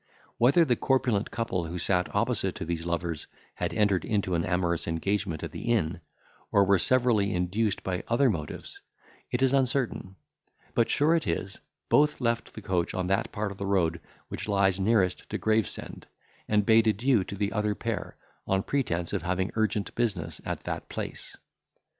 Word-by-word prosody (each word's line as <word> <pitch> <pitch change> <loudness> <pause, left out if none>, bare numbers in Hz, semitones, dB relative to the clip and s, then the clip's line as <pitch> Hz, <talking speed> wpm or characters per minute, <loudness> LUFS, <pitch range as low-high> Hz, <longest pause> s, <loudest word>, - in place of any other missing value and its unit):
Whether 140 +8 +5
the 125 -5 +2
corpulent 125 -5 +1
couple, 100 -7 -2
who 85 +2 -5
sat 90 0 +1
opposite - - +1
to - - -5
these 85 0 -3
lovers, 85 -2 -2 0.3
had - - -2
entered 100 -5 +2
into 100 -4 0
an 85 -1 +1
amorous 85 -2 0
engagement 85 0 -1
at - - -4
the 120 - -3
inn, 85 -7 0 0.5
or 100 - +5
were 100 -1 +4
severally 115 -4 +2
induced 100 +4 0
by 90 -2 -2
other 120 +4 +3
motives, 80 -10 -4 0.5
is 130 +2 +2
uncertain; 130 -7 0 0.6
but 115 - +2
sure 155 +3 +4
it 165 - -1
is, 100 0 -3 0.3
both 150 +1 +3
left 115 -2 -1
the 110 - -8
coach 90 -4 -1
on 90 - -1
that 95 - 0
part 105 -1 -2
of 100 - -10
the 100 - -3
road 85 -4 +1 0.3
which - - -5
lies 100 -2 +3
nearest 95 -2 +1
to - - -2
Gravesend, 110 -2 -1 0.4
and 105 -1 +2
bade 110 +1 +5
adieu 110 0 +3
to - - -6
the 100 +1 -1
other 105 -1 0
pair, 115 0 -4 0.3
on 95 0 +1
pretence 90 -12 -1
of 100 - 0
having 95 +2 -1
urgent 110 -2 0
business 100 -10 -2
at - - -4
that - - -5
place. - - -6
100 Hz, 170 wpm, -28 LUFS, 90-115 Hz, 0.6 s, Whether